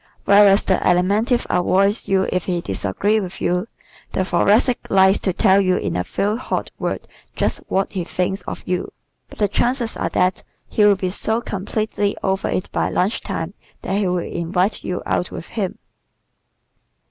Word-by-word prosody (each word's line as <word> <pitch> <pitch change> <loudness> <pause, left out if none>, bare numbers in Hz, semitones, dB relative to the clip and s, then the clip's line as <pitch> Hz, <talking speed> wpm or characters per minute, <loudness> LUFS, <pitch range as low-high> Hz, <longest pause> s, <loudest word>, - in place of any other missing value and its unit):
Whereas 200 0 +6
the 190 - +3
Alimentive 205 +8 +2
avoids 195 +4 +2
you 190 -1 +2
if 180 -1 -1
he 180 -2 -1
disagrees 170 - 0
with 185 0 -7
you, 180 +4 0 0.5
the 185 - 0
Thoracic 210 +8 +2
likes 190 0 +5
to 190 - 0
tell 195 +1 +4
you 185 -1 +2
in - - -2
a 90 - 0
few 205 - -1
hot 255 - -3
words - - -3 0.3
just - - -1
what 195 0 0
he 185 -3 -2
thinks 185 +2 -2
of - - -5
you. 180 -1 -2 0.4
But - - -13
the 205 - +2
chances 240 +3 0
are - - -2
that 180 0 +1 0.3
he 215 - +1
will 205 -1 +6
be 185 -1 -2
so 220 +4 0
completely 205 -1 -2
over 190 0 0
it 185 - -2
by - - 0
lunch 195 +5 0
time 185 -2 -4 0.3
that 195 +2 -1
he 200 - +1
will 180 0 0
invite 180 +4 -1
you 180 - -3
out 175 - -1
with - - -8
him. 200 -5 -3
195 Hz, 175 wpm, -20 LUFS, 180-205 Hz, 0.5 s, Whereas